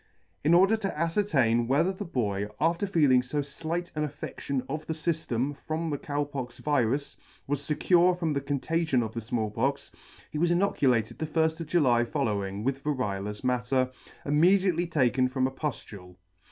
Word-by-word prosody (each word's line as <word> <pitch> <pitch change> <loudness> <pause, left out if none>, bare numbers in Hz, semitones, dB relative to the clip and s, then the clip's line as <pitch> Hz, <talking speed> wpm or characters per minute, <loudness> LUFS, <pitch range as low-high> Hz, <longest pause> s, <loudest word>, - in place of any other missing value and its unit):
In 160 +4 +5
order 195 +5 +5
to 200 -3 -2
afcertain 150 - +1
whether 160 +9 +2
the 200 +2 -6
boy, 105 - -1
after 170 +5 +1
feeling 145 -9 +4
fo 140 +3 -2
flight 165 +5 -4
an 150 - -2
affedtion 140 -2 -4
of 155 +3 -5
the 160 - -2
fyflem 145 -5 -1
from 160 0 -2
the 145 - -2
Cow 145 0 -2
Pox 130 -4 -6
virus, 140 -1 0 0.3
was 145 0 -1
fecure 175 +3 +3
from 165 -4 -1
the 140 - -1
contagion 145 0 0
of 110 -1 -5
the 115 - -4
Small 110 -1 -2
Pox, 135 +6 -1 0.4
he 150 - -3
was 170 +1 +3
inoculated 135 - +1
the 155 - -2
lfl: 160 +1 +1
of 165 - -5
July 130 -8 +3
following 100 -3 -2
with 135 +2 -2
variolous 105 -8 -2
matter, 125 +1 +1 0.3
immediately 175 +3 +3
taken 130 -5 +2
from 130 0 0
a 130 - 0
puftule. 105 - -6
145 Hz, 165 wpm, -28 LUFS, 125-165 Hz, 0.4 s, In